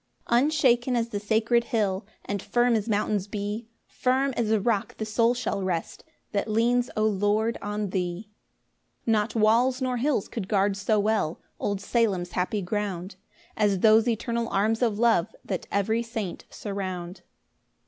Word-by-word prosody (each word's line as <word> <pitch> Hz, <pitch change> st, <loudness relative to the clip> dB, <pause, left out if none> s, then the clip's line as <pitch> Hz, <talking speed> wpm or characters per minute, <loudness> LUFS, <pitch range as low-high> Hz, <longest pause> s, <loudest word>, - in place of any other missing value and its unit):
1 240 Hz, +3 st, +4 dB
Unshaken 255 Hz, -5 st, +2 dB
as 235 Hz, -1 st, 0 dB
the 205 Hz, -, -3 dB
sacred 225 Hz, +3 st, +2 dB
hill, 200 Hz, -3 st, -1 dB, 0.2 s
And 200 Hz, -1 st, -3 dB
firm 240 Hz, +2 st, +2 dB
as 220 Hz, 0 st, 0 dB
mountains 205 Hz, -1 st, 0 dB
be, 210 Hz, +2 st, -4 dB, 0.2 s
Firm 265 Hz, +2 st, 0 dB
as 230 Hz, -3 st, 0 dB
a 220 Hz, -1 st, +3 dB
rock 225 Hz, +2 st, -1 dB
the 220 Hz, -, -3 dB
soul 230 Hz, +3 st, +2 dB
shall 240 Hz, -5 st, -2 dB
rest 180 Hz, -3 st, -3 dB, 0.3 s
That 205 Hz, +2 st, -1 dB
leans, 240 Hz, +3 st, +2 dB
O 215 Hz, -, +3 dB
Lord, 215 Hz, +2 st, +1 dB
on 205 Hz, -1 st, -3 dB
thee. 185 Hz, +3 st, -3 dB, 0.7 s
2 230 Hz, -, +1 dB
Not 215 Hz, +1 st, +1 dB
walls 235 Hz, +4 st, +3 dB
nor 255 Hz, -2 st, -1 dB
hills 255 Hz, -4 st, 0 dB
could 210 Hz, -5 st, -5 dB
guard 200 Hz, -1 st, +2 dB
so 205 Hz, +2 st, +1 dB
well 205 Hz, -6 st, 0 dB, 0.2 s
Old 200 Hz, -1 st, -1 dB
Salem's 200 Hz, -7 st, 0 dB
happy 185 Hz, +3 st, -1 dB
ground, 190 Hz, -1 st, -3 dB, 0.4 s
As 200 Hz, -3 st, +1 dB
those 220 Hz, +1 st, +6 dB
eternal 235 Hz, 0 st, -1 dB
arms 215 Hz, +4 st, +1 dB
of 225 Hz, -4 st, +1 dB
love 225 Hz, -5 st, +2 dB
That 185 Hz, -3 st, -4 dB
every 220 Hz, +3 st, +1 dB
saint 225 Hz, -6 st, -5 dB
surround. 185 Hz, -3 st, -5 dB
215 Hz, 160 wpm, -26 LUFS, 200-235 Hz, 0.7 s, those